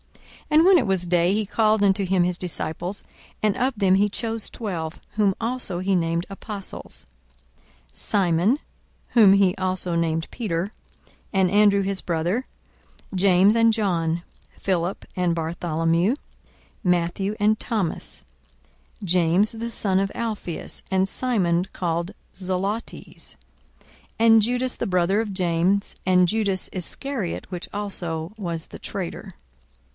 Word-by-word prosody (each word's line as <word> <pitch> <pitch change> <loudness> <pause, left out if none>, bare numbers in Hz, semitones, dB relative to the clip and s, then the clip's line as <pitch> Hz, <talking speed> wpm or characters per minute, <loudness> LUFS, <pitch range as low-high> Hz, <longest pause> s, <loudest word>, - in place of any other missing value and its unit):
42:006:013 305 - +5
And 335 - +5
when 380 -1 +8
it - - -1
was 190 -2 +1
day, 175 +1 +2
he 215 +1 0
called 215 0 +2
unto 195 0 +3
him 185 -1 +2
his 175 0 0
disciples: 180 +2 -3 0.4
and 210 -2 +2
of 260 +2 +1
them 190 -2 +4
he 205 +2 +3
chose 225 +1 -4
twelve, 170 -8 -5
whom 205 -2 +2
also 230 -5 -2
he 190 +1 +1
named 170 0 0
apostles; 200 0 -7 0.9
42:006:014 - - -15
Simon, 195 - +2 0.5
(whom 215 -5 +7
he 195 -2 +4
also 185 -2 -2
named 165 -1 0
Peter,) 200 -4 -2 0.6
and 190 -3 +3
Andrew 205 -1 +5
his 195 -1 +1
brother, 175 +9 -1 0.7
James 190 +2 +5
and 230 0 +5
John, 170 -6 0 0.3
Philip 180 0 -1
and 180 -2 +1
Bartholomew, 165 +3 0
42:006:015 - - -5 0.7
Matthew 180 +3 0
and 215 +1 +3
Thomas, 205 -8 -3 0.8
James 180 +2 +3
the 230 +1 -4
son 190 -4 +1
of 195 0 -1
Alphaeus, 215 -7 -4
and 190 0 +2
Simon 185 -8 +1
called 170 +1 -2 0.2
Zelotes, 190 +4 -3 0.4
42:006:016 - - -29
And 225 -1 +6
Judas 245 +3 0
the - - -3
brother 185 +3 +2
of 220 -3 -4
James, 185 +2 +1
and 180 -1 +5
Judas 200 -2 0
Iscariot, 205 +2 -3
which 180 -1 -5
also 175 -4 -3
was 170 -6 -4
the - - -11
traitor. - - -6
190 Hz, 135 wpm, -24 LUFS, 175-215 Hz, 0.9 s, when